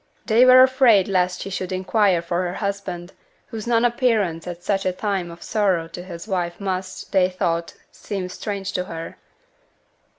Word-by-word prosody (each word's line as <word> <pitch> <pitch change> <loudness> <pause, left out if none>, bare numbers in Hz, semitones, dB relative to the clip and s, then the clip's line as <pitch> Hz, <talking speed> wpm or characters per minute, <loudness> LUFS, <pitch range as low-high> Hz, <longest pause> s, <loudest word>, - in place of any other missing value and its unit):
They 235 +2 +5
were 255 0 +9
afraid 260 -7 +4
lest 180 -2 0
she 195 - -7
should 185 -1 -4
inquire 185 -1 +2
for 175 +1 -1
her 175 - -5
husband, 195 -3 -4 0.3
whose 225 0 -7
non 235 0 +3
appearance 220 -9 +1
at 175 0 -7
such 195 0 0
a 185 - +1
time 190 -2 -2
of 170 0 -11
sorrow 190 -6 0
to 170 +2 -8
his 175 +1 -9
wife 175 -4 -2
must 185 -1 -4
(they 185 -2 +3
thought) 170 -2 -2 0.2
seem 195 -3 -5
strange 195 +1 -5
to 180 -1 -2
her. 165 -2 -7
190 Hz, 170 wpm, -22 LUFS, 175-210 Hz, 0.3 s, were